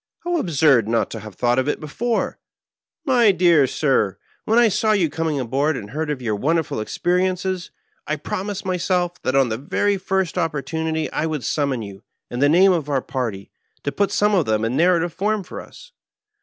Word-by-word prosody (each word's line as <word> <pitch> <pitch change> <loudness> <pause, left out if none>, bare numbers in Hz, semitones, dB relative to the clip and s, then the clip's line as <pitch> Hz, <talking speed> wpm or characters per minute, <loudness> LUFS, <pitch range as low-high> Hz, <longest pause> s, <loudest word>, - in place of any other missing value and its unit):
"How 350 0 -1
absurd 150 - +3
not 115 0 0
to 115 - -5
have 105 -2 -10
thought 120 +4 +2
of 130 - -1
it 150 - -1
before 225 +10 -2 0.6
1 270 -5 +1
My 230 -4 +6
dear 170 -6 +4
sir, 130 -9 +1 0.3
when 225 - +2
I 240 -1 +6
saw 215 +1 +2
you 175 -7 +1
coming 160 -2 -1
aboard 135 +4 0
and 105 -3 -8
heard 155 +3 -3
of 140 -4 -3
your 110 -3 0
wonderful 160 +7 0
experi 175 +11 0
ences, 185 0 -4 0.4
I 155 - 0
promised 195 +7 -4
myself 180 -1 -1
that 130 - -1
on 135 -3 +4
the 110 +1 -3
very 200 +8 0
first 190 -2 -1
oppor 160 -5 -1
tunity 160 -1 -2
I 160 - 0
would 155 -5 -3
summon 140 -6 -1
you, 100 -1 -10 0.3
in 120 - -4
the 145 +1 +4
name 185 +5 +6
of 160 -5 -1
our 135 -3 0
party, 115 -7 -4 0.3
to 140 - -1
put 200 +5 0
some 210 0 +2
of 180 -6 +2
them 110 0 +1
in 115 +3 -1
narrative 170 +1 +2
form 210 +1 -1
for - - -8
us. - - -15
160 Hz, 205 wpm, -21 LUFS, 130-185 Hz, 0.6 s, My